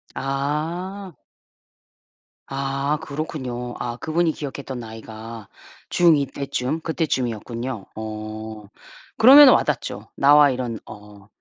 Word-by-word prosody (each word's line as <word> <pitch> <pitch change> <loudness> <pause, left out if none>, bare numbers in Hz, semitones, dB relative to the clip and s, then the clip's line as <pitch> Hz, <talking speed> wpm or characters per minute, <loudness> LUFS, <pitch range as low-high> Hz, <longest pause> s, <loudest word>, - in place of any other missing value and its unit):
아. 160 +8 -3 1.4
아. 135 +2 -1
그렇군요. 130 -5 -5
아 120 -1 -4
그분이 160 +4 0
기억했던 140 -3 -6
나이가 110 -1 -9 0.4
중 170 -2 +5
2 140 - 0
때쯤 140 +3 -3
그때쯤이었군요. 125 - -3
어. 110 0 -7 0.5
그러면은 270 +3 +9
와 - - +3
닿죠. 115 -6 -4
나와 145 +1 +6
이런 125 -4 -3
어 105 -1 -13
135 Hz, 210 characters per minute, -22 LUFS, 115-150 Hz, 1.4 s, 그러면은